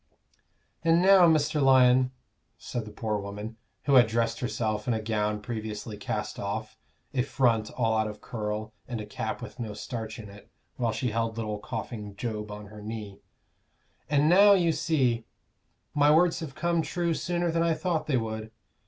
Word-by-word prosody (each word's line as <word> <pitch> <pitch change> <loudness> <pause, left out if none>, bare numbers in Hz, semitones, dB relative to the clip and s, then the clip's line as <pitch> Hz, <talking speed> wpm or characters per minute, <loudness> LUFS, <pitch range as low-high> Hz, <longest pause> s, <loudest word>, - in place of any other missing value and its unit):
"And 165 +1 +4
now, 185 -1 +7
Mr. 155 -1 +2
Lyon," 130 -1 +5 0.5
said 120 -3 -5
the 105 - -9
poor 105 -1 -2
woman, 105 +3 -7 0.3
who 140 - +1
had 125 -4 +7
dressed 115 0 0
herself 110 -2 -2
in 120 - +2
a - - -1
gown 105 -1 -1
previously 110 -1 -5
cast 105 - -4
off, - - -4 0.4
a 130 - +2
front 120 -5 +1
all 115 -3 +2
out 110 0 +1
of 105 0 -7
curl, 110 -1 -4
and 120 -3 -4
a 105 - -5
cap 105 - -4
with - - -9
no 110 -3 -4
starch 110 0 -5
in 110 - -8
it, 100 0 -14 0.3
while 120 -2 0
she 120 +1 -2
held 115 0 -1
little 105 -2 -3
coughing 105 -3 -6
Job 105 -1 -4
on 105 0 -7
her 105 +1 -11
knee, 105 -2 -7 0.9
"and 145 0 +3
now 200 +4 +7
you 175 -4 +3
see 145 -7 +1 0.7
my 145 0 +4
words 165 +3 +4
have 150 -5 -7
come 170 +1 +1
true 170 +1 -1
sooner 175 +1 -1
than 165 0 +1
I 165 -1 +2
thought 170 -2 -1
they 135 -4 +2
would. 110 -1 -4
115 Hz, 180 wpm, -28 LUFS, 110-150 Hz, 0.9 s, now